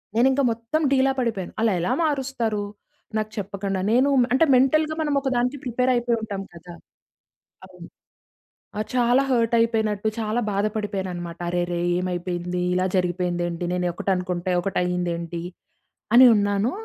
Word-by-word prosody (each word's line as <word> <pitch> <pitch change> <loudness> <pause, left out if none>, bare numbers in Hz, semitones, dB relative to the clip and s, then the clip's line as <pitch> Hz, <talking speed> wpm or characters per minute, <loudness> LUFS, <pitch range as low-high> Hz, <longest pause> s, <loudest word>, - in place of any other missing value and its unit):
నేనింకా 265 +4 +3
మొత్తం 230 +8 -2
డీలా 270 0 +3
పడిపోయాను. 220 -7 -2
అలా 225 -1 +3
ఎలా 175 - -1
మారుస్తారు? 260 -8 -1 0.5
నాకు 215 0 -2
చెప్పకుండా? 195 -1 -3
నేను 255 +4 +4 0.2
అంటే 295 +5 +4
మెంటల్‌‌గా 310 +5 +3
మనం 295 -2 0
ఒక 270 - -1
దానికి 250 +4 0
ప్రిపేర్ 250 +1 0
అయిపోయి 240 -1 +1
ఉంటాం 205 -3 -4
కదా 170 +1 -11 0.9
అవును. - - -13 0.9
ఆ! - - -1
చాలా 245 +1 +3
హర్ట్ 235 -2 +2
అయిపోయినట్టు, 220 -2 +1
చాలా 220 +2 -1
బాధపడిపోయాను 205 -2 -2
అన్నమాట. 175 -1 -7
"అరెరే 175 0 -1 0.2
ఏమైపోయింది? 180 0 -3
ఇలా 185 +1 +1
జరిగిపోయిందేంటి? 175 -1 -1
నేను 180 0 -1
ఒకటి 195 - -3
అనుకుంటే 180 0 -3
ఒకటి 190 +2 -2
అయిందేంటి?" 170 -1 -2 0.7
అని 250 +2 +9
ఉన్నాను, 205 +3 +1
210 Hz, 135 wpm, -23 LUFS, 180-245 Hz, 0.9 s, అని